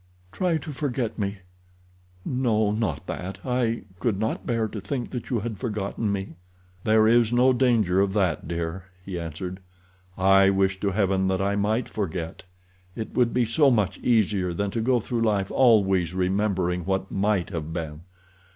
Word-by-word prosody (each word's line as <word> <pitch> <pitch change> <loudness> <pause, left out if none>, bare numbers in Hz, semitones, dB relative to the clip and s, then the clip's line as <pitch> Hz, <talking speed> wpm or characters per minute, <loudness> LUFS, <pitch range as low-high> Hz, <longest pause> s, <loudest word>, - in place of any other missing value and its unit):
"Try 175 - 0
to 155 - -7
forget 130 -6 -3
me—no, 90 +4 -3
not 110 0 -2
that—I 115 +5 -2 0.2
could 105 +1 0
not 110 +2 -2
bear 115 -2 +1
to 105 -1 -7
think 120 +4 -4
that 125 -3 -5
you 120 -5 0
had 110 -2 -5
forgotten 105 -2 -2
me." 95 -4 -4 0.5
"There 110 0 +4
is 115 0 +4
no 125 +2 +4
danger 115 -7 +3
of 100 -1 +1
that, 95 -8 0
dear," 85 +2 -4 0.2
he 90 -3 -4
answered. 85 +3 -6 0.6
"I 95 +1 +5
wish 95 -1 +1
to 100 - 0
Heaven 95 -1 +1
that 95 0 0
I 100 +1 0
might 110 +4 0
forget. 85 -5 -4 0.5
It 110 - -5
would 120 -2 +2
be 125 -1 +2
so 140 +6 +4
much 100 -6 +1
easier 100 -6 +1
than 100 +2 -1
to 115 - -2
go 125 +2 +2
through 115 +1 -3
life 105 -4 +1
always 95 -8 +3
remembering 95 -2 0
what 95 +1 -2
might 100 -2 0
have 80 -3 -4
been. 80 -2 -5
100 Hz, 160 wpm, -25 LUFS, 95-115 Hz, 0.6 s, I